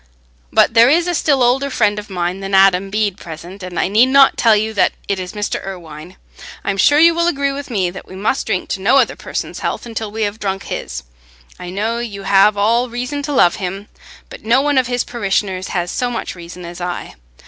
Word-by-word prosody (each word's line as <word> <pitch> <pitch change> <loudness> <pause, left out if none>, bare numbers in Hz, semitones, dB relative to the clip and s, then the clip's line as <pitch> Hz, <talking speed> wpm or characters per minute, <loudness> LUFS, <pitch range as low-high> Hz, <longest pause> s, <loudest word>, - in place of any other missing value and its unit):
But - - +4
there 230 +2 +6
is 335 +4 +3
a 355 - -1
still 285 -5 +2
older 265 +3 +2
friend 210 -5 +1
of 210 - -10
mine 180 0 -2
than 195 0 -2
Adam 195 0 +4
Bede 205 -1 -1
present, 175 +4 -10
and 180 -2 -5
I - - +1
need 220 +6 +4
not 275 +1 +5
tell 225 -2 +4
you 220 +1 -1
that 190 -4 +2
it 200 -1 -1
is 180 0 -6
Mr. 210 -1 -3
Irwine. 175 -2 -9 0.5
I'm 200 -1 -2
sure 290 +9 +4
you 335 +2 +6
will 340 +1 +1
agree 280 -4 0
with 280 0 -6
me 190 -7 0
that 190 - -10
we 185 - -11
must 210 +7 -1
drink - - -1
no - - +3
other - - +2
person's - - -5
health - - -3
until 225 -2 -5
we 220 +1 -2
have 205 +1 -3
drunk 195 -1 -3
his. 60 +1 -5 0.6
I 180 - -7
know 220 +5 -2
you 205 -5 -6
have 200 +2 +4
all 230 +4 +2
reason 250 +4 -4
to 290 +1 -4
love 175 -11 +3
him, 195 +2 -5 0.4
but - - -12
no 235 +4 +3
one 285 -1 +2
of 255 - 0
his 245 0 -1
parishioners 195 -4 -2
has 175 -1 -2
so 250 - -1
much 240 - -4
reason 175 0 -10
as 175 +1 -9
I. 175 0 -5
205 Hz, 225 wpm, -17 LUFS, 190-245 Hz, 0.6 s, there